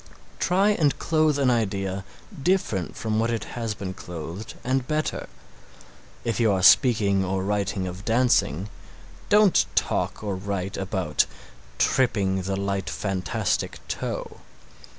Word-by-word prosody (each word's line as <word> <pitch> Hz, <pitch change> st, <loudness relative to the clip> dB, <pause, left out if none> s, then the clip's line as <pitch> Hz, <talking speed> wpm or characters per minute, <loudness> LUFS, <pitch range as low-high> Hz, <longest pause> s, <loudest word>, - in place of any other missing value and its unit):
Try 190 Hz, +6 st, +3 dB
and 155 Hz, -8 st, +2 dB
clothe 155 Hz, -2 st, +2 dB
an 135 Hz, -3 st, +3 dB
idea 95 Hz, -4 st, -1 dB, 0.4 s
different 135 Hz, -, 0 dB
from 110 Hz, -1 st, -1 dB
what 115 Hz, +1 st, +1 dB
it 115 Hz, -3 st, -1 dB
has 115 Hz, -3 st, -4 dB
been 95 Hz, -2 st, -5 dB
clothed 85 Hz, +4 st, -7 dB
and 130 Hz, 0 st, 0 dB
better. 155 Hz, 0 st, -2 dB, 0.9 s
If 115 Hz, 0 st, -1 dB
you 115 Hz, -3 st, +4 dB
are 95 Hz, -2 st, 0 dB
speaking 100 Hz, -3 st, +5 dB
or 95 Hz, 0 st, -1 dB
writing 100 Hz, -1 st, -1 dB
of 90 Hz, +2 st, -7 dB
dancing 110 Hz, -, +2 dB, 0.6 s
don't 210 Hz, -, +5 dB
talk -, -, 0 dB
or 100 Hz, -2 st, -2 dB
write 95 Hz, 0 st, -3 dB
about 95 Hz, -5 st, 0 dB, 0.5 s
"tripping 100 Hz, -7 st, +2 dB
the 95 Hz, +1 st, -2 dB
light 100 Hz, 0 st, -2 dB
fantastic 95 Hz, -3 st, -1 dB
toe." -, -, -4 dB
100 Hz, 130 wpm, -25 LUFS, 95-125 Hz, 0.9 s, speaking